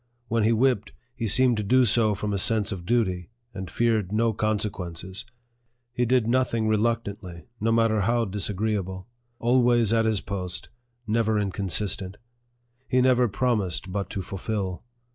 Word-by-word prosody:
When 115 0 +1
he 110 +2 +3
whipped, 115 -2 +1 0.2
he 115 -2 -3
seemed 125 +2 +4
to 105 - -1
do 130 +5 +4
so 110 -1 +3
from 105 +1 -3
a 100 - 0
sense 110 +1 +2
of 90 -3 -6
duty, 95 -7 0 0.2
and 95 -2 -6
feared 110 -5 0
no 115 +1 +1
consequences. 95 -4 -3 0.7
He 120 0 0
did 125 -2 +3
nothing 115 -2 +1
reluctantly, 105 -6 -1
no 115 +2 +1
matter 115 -2 +3
how 115 +3 +1
disagreeable; 100 -1 -2 0.3
always 120 -2 +3
at 115 -1 +3
his 110 -2 +1
post, 95 -3 -5 0.4
never 110 0 +1
inconsistent. 100 -1 -2 0.7
He 130 - +2
never 125 -1 +4
promised 100 -4 -1
but 100 +1 -3
to 95 - -4
fulfil. 95 0 -4
110 Hz, 145 wpm, -25 LUFS, 95-115 Hz, 0.7 s, seemed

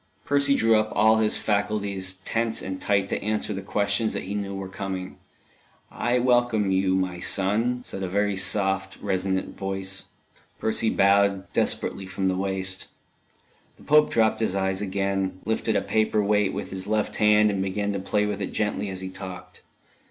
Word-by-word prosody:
Percy 140 -1 +3
drew 115 -2 +4
up 110 0 -2
all 110 +1 +5
his 110 -1 +2
faculties 100 -2 -1
tense 115 0 -1
and 95 -1 -5
tight 100 -1 +1
to - - -2
answer 105 0 -1
the 95 - -4
questions 100 +2 0
that - - -3
he 100 - -5
knew 100 -1 -3
were 95 0 -5
coming. 95 -1 -5 0.7
"I 120 +1 0
welcome 120 -5 +2
you, 95 0 +2
my 95 -2 -1
son," 110 +7 0
said 95 - -6
a 95 - -2
very 100 +2 0
soft, 95 0 +1
resonant 95 -1 -2
voice. 95 0 -3 0.5
Percy 110 0 0
bowed, 100 -1 +2
desperately, 95 -1 0
from 95 0 -1
the 95 - 0
waist. 95 0 -1 0.9
The - - -17
Pope 150 0 +5
dropped 110 -1 +2
his 110 -4 0
eyes 95 0 0
again, 95 -1 -1
lifted 110 0 0
a - - +2
paper 110 -1 +1
weight 105 -1 +2
with - - -5
his 95 0 -5
left 105 0 -1
hand, 105 0 +5
and 100 -1 -1
began 100 +2 -1
to 100 - -2
play 105 +2 0
with 105 -1 -3
it - - -3
gently 105 -1 -1
as 95 -1 -5
he 95 - -5
talked. 95 -1 -9
100 Hz, 175 wpm, -25 LUFS, 95-110 Hz, 0.9 s, all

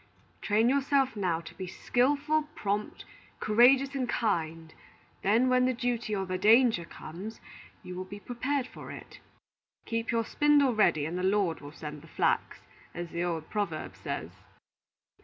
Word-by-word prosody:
Train 215 +2 +2
yourself 275 -1 +2
now 180 -5 0
to 165 - -11
be 185 - -6
skilful, 290 - +1
prompt, 205 +1 -3 0.3
courageous, 260 +5 +5
and 260 -3 -2
kind; 165 -7 -1 0.5
then 225 +6 +3
when 255 0 +4
the 255 -1 +1
duty 240 -3 -1
or 195 -1 -2
the 185 0 -3
danger 220 -3 +5
comes, 185 +7 -9 0.4
you 180 - -7
will 185 +1 -5
be 205 +2 -9
prepared 255 +4 -2
for - - -10
it. - - -11 0.7
'Keep 230 0 -2
your 230 -1 +1
spindle 290 -2 +3
ready, 185 -9 +3
and 170 +4 -3
the - - -2
Lord 190 -3 +1
will 145 0 -9
send 150 -1 -8
the - - -15
flax,' - - 0 0.3
as 175 0 -5
the 170 +1 -2
old 165 -3 -2
proverb 200 -7 -3
says." - - -5
215 Hz, 160 wpm, -29 LUFS, 175-255 Hz, 0.7 s, courageous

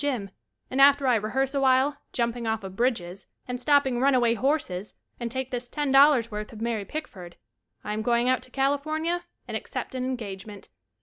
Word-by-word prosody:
gym, 240 -9 -2 0.4
and 265 +1 +2
after 280 0 +6
I 255 - +4
rehearse 255 +5 0
a 280 - 0
while 265 +2 +3 0.2
jumping 235 -1 -1
off 220 -1 -1
of 190 -1 -7
bridges, 195 -6 -1 0.2
and 250 0 -4
stopping 270 -2 +3
runaway 255 -4 +4
horses 235 -7 -1 0.2
and 235 -1 -3
take 260 +2 -4
this 245 -1 -4
Ten 290 0 -1
Dollars 270 -4 +6
worth 210 0 -5
of 220 - -10
Mary 225 -3 -2
Pick 310 +5 -5
ford, 175 -3 -12 0.5
I 210 - -3
am 215 - -2
going 235 +2 +2
out 255 0 +2
to - - -10
California 310 +6 -1 0.2
and - - -5
ac - - -5
cept - - -5
an 255 -1 -3
engagement. 210 -5 -6
250 Hz, 195 wpm, -26 LUFS, 220-275 Hz, 0.5 s, after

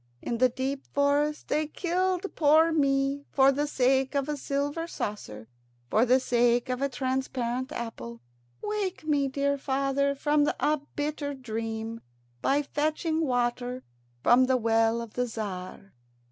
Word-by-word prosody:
In 235 - -3
the 255 0 +5
deep 265 +2 -4
forest 290 +1 +1
they 300 +1 0
killed 365 +3 -1
poor 315 +2 +5
me 275 -2 +1
for 270 0 +5
the 290 +2 -1
sake 265 0 +1
of 280 0 0
a 300 - -1
silver 285 +4 -2
saucer, 110 - -5 0.4
for 230 +4 +4
the 255 +2 +5
sake 245 0 +2
of 250 +1 -2
a 280 - +1
transparent 260 -1 -2
apple. 115 - -6 0.4
Wake 410 -5 -2
me, 290 -3 +2
dear 280 +1 0
father, 275 +1 0
from 295 +1 +2
a 300 -1 +1
bitter 290 -1 -2
dream, 225 -2 -5 0.4
by 285 +2 +2
fetching 310 +3 -1
water 245 -2 -1 0.4
from 250 +2 +6
the 255 0 +2
well 225 0 +2
of 230 - -11
the 250 - 0
Tzar." 195 -3 -6
270 Hz, 145 wpm, -28 LUFS, 240-290 Hz, 0.4 s, from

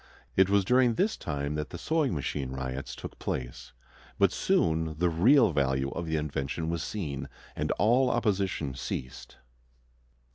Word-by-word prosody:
It 95 0 +5
was 100 -1 +3
during 125 +1 +4
this 210 - +1
time 70 -1 -3
that 75 0 -3
the - - -7
"sewing 155 - 0
machine 70 -2 -3
riots" 65 0 -5
took - - -9
place; 60 0 -4 0.5
but - - +4
soon 80 -1 +1
the 90 +1 +2
real 115 - +5
value 65 -2 0
of 85 - -4
the 80 - -1
invention 75 +2 -2
was 85 -1 -2
seen, 80 -8 -4 0.3
and - - -2
all 125 +4 +3
opposition 95 - 0
ceased. 65 -1 -6
80 Hz, 150 wpm, -29 LUFS, 70-100 Hz, 0.5 s, It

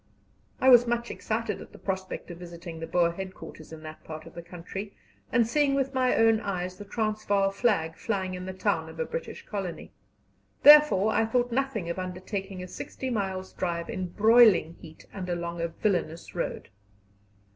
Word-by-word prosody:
I 260 - +5
was 245 -1 +8
much 235 0 -1
excited 220 0 -3
at - - -12
the - - -11
prospect 190 -2 -4
of 170 - -9
visiting 170 -1 -8
the 165 - -5
Boer 170 -1 +2
headquarters 185 -3 -9
in 160 -1 -10
that 155 0 -10
part 155 -1 -8
of - - -12
the 170 - -7
country, 180 +4 -8 0.4
and 235 -1 +4
seeing 275 +4 +2
with 270 0 0
my 255 -1 +2
own 225 -1 +4
eyes 185 -3 -3
the 205 - -9
Transvaal 205 -2 0
flag 195 -7 +1
flying 190 -4 -2
in 180 0 -6
the - - -3
town 185 - -1
of - - -12
a 485 - 0
British - - -6
colony. 195 -5 -5 0.7
Therefore 295 -9 +8
I 225 - +2
thought 245 +1 +1
nothing 255 -7 -1
of 170 +2 -3
undertaking 185 +1 -5
a - - -7
sixty 260 +7 -6
miles' 190 -4 -3
drive 170 -2 -3
in 185 -1 -3
broiling 215 -3 +5
heat 160 -1 -13
and 185 -2 -5
along 170 -1 -3
a 170 - 0
villainous 170 -2 -2
road. 175 - -4
190 Hz, 180 wpm, -28 LUFS, 175-225 Hz, 0.7 s, was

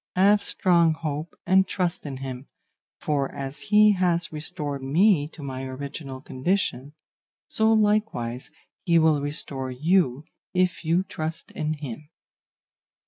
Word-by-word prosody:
Have 200 +3 +5
strong 170 -5 +3
hope 155 0 -5
and 190 +1 +4
trust 180 -4 -2
in 135 -2 -5
him, 130 0 -7 0.5
for 140 -2 -1
as 135 0 -5
he 210 0 +7
has 175 -3 +1
restored 150 -3 -3
me 155 +3 +3
to 155 -1 -12
my 130 -1 -5
original 135 0 -7
condition, 140 -2 -2 0.5
so 220 0 +2
likewise 210 - +1 0.3
he 170 -1 +3
will 160 -3 +4
restore 140 -2 -3
you 150 0 +1 0.3
if 180 -1 +1
you 170 +3 +2
trust 160 -3 -5
in 155 0 -2
him. 145 0 -8
155 Hz, 130 wpm, -25 LUFS, 135-180 Hz, 0.5 s, he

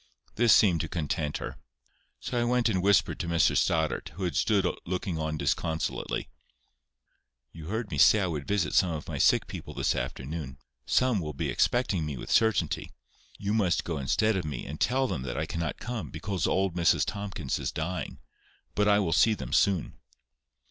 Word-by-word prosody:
This 120 0 +3
seemed 90 -7 +5
to 80 - -3
content 75 -2 -2
her. - - -6 0.6
So 120 -1 -2
I - - +2
went 120 0 +2
and 95 -4 0
whispered 100 -2 +3
to - - -3
Mr 85 -1 +3
Stoddart, 80 -2 +1
who 95 - -5
had 85 -5 -1
stood - - +2 0.2
looking 90 -1 -3
on 80 0 -2
disconsolately:— 80 +1 -2 1.2
"You 80 -1 -10
heard 110 +2 -3
me 75 - -2
say 75 +8 +7
I - - +1
would 75 -5 -4
visit 100 -3 0
some 95 - +4
of 75 - -6
my - - -4
sick - - +4
people - - -8
this - - +1
afternoon. 70 0 -5 0.3
Some 125 -5 +2
will 75 -3 -4
be - - -3
expecting 120 -9 +1
me 75 -3 -4
with - - -7
certainty. 110 -1 +2 0.5
You 100 +1 -2
must 100 -6 +2
go 80 -4 -3
instead 110 - +1
of 95 - -1
me, 70 -5 -5
and 75 +3 -7
tell 130 +1 +2
them 85 - -3
that 60 -1 -4
I 80 - -1
cannot 85 -1 -3
come, 115 - -5
because 95 +7 -2
old 95 -1 +1
Mrs 85 -2 +3
Tomkins 100 -9 -3
is - - -2
dying; 90 +3 -4 0.6
but 105 0 +1
I 100 -1 +5
will 95 -5 +1
see 105 +6 +4
them - - -7
soon." 95 -5 +1
90 Hz, 190 wpm, -28 LUFS, 80-105 Hz, 1.2 s, say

